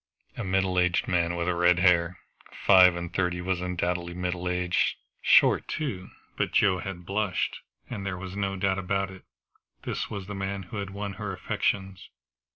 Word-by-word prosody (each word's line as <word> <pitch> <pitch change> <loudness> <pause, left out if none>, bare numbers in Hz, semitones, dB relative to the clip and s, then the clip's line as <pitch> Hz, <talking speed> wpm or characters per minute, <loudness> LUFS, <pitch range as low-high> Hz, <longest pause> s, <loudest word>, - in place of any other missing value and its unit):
A - - -4
middle 95 -1 +1
aged 90 -1 +2
man 85 -1 +1
with 85 0 -2
red 90 0 +3
hair! 90 -1 +3 0.5
Five 90 -2 +7
and 85 -1 -5
thirty 90 -1 0
was 90 0 -1
undoubtedly 90 -1 -2
middle 90 0 -2
age. 90 0 +1 0.2
Short, - - +5
too. 120 - -4 0.3
But - - -1
Joe 95 -2 +4
had 90 -2 -6
blushed, 100 0 -1 0.3
and 110 -5 -5
there 95 -2 -3
was 95 +1 -7
no 100 -1 -1
doubt 95 0 0
about 95 +1 -1
it; 95 -1 -13 0.6
this - - -3
was 100 -2 -5
the 105 - -6
man 95 0 -3
who 95 +5 -8
had 100 -1 -3
won 100 0 -5
her 100 -2 -3
affections. 95 +1 -2
95 Hz, 170 wpm, -27 LUFS, 90-95 Hz, 0.6 s, Five